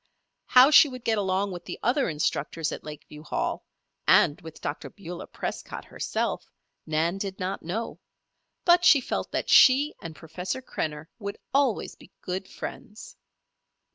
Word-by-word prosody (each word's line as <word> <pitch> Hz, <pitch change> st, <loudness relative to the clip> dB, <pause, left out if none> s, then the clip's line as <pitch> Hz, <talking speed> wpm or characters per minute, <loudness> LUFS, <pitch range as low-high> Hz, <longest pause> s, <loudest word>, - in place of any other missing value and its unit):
How 260 Hz, +3 st, +7 dB
she 295 Hz, 0 st, +8 dB
would 255 Hz, -2 st, -9 dB
get 220 Hz, -2 st, +1 dB
along 195 Hz, 0 st, 0 dB
with 175 Hz, -1 st, -7 dB
the -, -, -6 dB
other 260 Hz, +1 st, +2 dB
instructors 155 Hz, +1 st, -1 dB
at -, -, -6 dB
Lakeview 150 Hz, 0 st, -10 dB
Hall, 155 Hz, -, -2 dB, 0.4 s
and 145 Hz, -, +5 dB
with 160 Hz, -1 st, -11 dB
Dr. 145 Hz, -, -5 dB
Beulah 180 Hz, -3 st, -9 dB
Prescott, -, -, -6 dB
herself, -, -, -3 dB, 0.4 s
Nan 165 Hz, +4 st, 0 dB
did 195 Hz, -1 st, -5 dB
not 185 Hz, +1 st, -3 dB
know; 210 Hz, +8 st, -4 dB, 0.7 s
but 350 Hz, -1 st, +5 dB
she 320 Hz, -5 st, +7 dB
felt 255 Hz, -, -3 dB
that -, -, -2 dB
she 280 Hz, +3 st, +6 dB
and 165 Hz, -2 st, -8 dB
Professor 180 Hz, +9 st, -5 dB
Krenner 155 Hz, -11 st, -4 dB
would 200 Hz, -1 st, -5 dB, 0.2 s
always 270 Hz, -5 st, +1 dB
be -, -, -17 dB
good 185 Hz, +1 st, -4 dB
friends. 230 Hz, -, -9 dB
190 Hz, 150 wpm, -26 LUFS, 160-255 Hz, 0.7 s, she